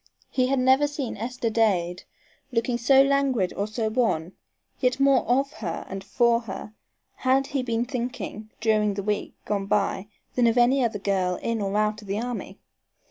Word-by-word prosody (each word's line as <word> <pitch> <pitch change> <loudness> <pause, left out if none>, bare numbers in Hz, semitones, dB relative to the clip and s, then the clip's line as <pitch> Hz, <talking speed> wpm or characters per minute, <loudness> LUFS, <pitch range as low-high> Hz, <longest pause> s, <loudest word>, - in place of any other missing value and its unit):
He 255 -1 +2
had 270 +1 +1
never 260 +3 +4
seen 285 -4 -4
Esther 235 +2 -3
Dade 185 -6 +1 0.5
looking 240 0 0
so 265 +3 +6
languid 275 -8 +1
or 200 - -1
so 220 +1 -2
wan, 215 -8 0 0.5
yet 250 0 +1
more 275 -2 +4
of 270 +3 +1
her 175 -6 -5
and 195 0 -6
for 235 +3 +2
her 215 -1 -8 0.4
had 265 +1 +2
he 275 -1 -2
been 235 -1 -1
thinking 240 -4 -5
during 215 -2 +2
the 200 - -3
week 210 0 -2
gone 200 -2 -2
by 200 -1 0 0.3
than 245 -2 +3
of 230 +1 +2
any 250 +2 +4
other 225 -3 0
girl 190 -2 0
in 230 +2 -2
or 200 +1 -1
out 215 0 0
of 205 - -13
the 200 +2 -1
army. 245 +1 -5
230 Hz, 180 wpm, -25 LUFS, 205-255 Hz, 0.5 s, so